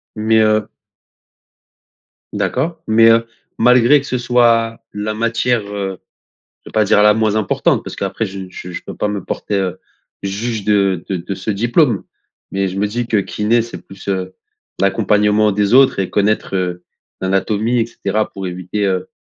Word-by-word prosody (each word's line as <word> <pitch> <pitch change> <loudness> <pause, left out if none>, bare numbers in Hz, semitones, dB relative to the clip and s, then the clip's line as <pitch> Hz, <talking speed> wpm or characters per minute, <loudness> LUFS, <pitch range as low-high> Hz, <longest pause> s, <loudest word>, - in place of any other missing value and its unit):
Mais, 110 +1 +2
heu 110 -1 +2 1.6
d'accord, 160 +5 -2
mais, 115 +1 +5
heu, 115 0 +3 0.3
malgré 125 +4 +5
que 140 - -10
ce 125 - -1
soit 115 -2 +2
la 105 +1 -3
matière, 115 +1 0
heu, 100 -2 -4 0.6
je - - -13
veux - - -14
pas 110 -1 +2
dire 105 +1 +4
la 105 0 +6
moins 110 -1 +1
importante, 105 -4 +1
parce - - -7
qu'après 110 - -2
je 95 0 -7
je 90 0 -9
je - - -6
peux - - -7
pas 105 - -1
me 100 -2 -3
porter, 105 - -3
heu, 95 -2 -2 0.4
juge 105 +2 -3
de 100 -4 +1
de 95 - -1
de 95 +3 -5
ce 95 +4 -3
diplôme. 120 - +2 0.5
Mais 95 0 0
je 95 - -6
me 105 - +1
dis 120 +2 -3
que 110 - +1
kiné, 105 +4 +1
c'est 115 - -9
plus, 95 0 -13
heu, 95 -1 -2 0.5
l'accompagnement 105 +1 +2
des 100 +2 +1
autres 130 -6 +5
et 95 - -1
connaître, 105 -1 0
heu, 90 -1 -2 0.4
l'anatomie 105 +5 0
et - - 0
cetera, 105 -1 -2
pour 95 -1 -5
éviter, 90 +3 -3
heu, 95 -1 -1
105 Hz, 175 wpm, -17 LUFS, 95-115 Hz, 1.6 s, la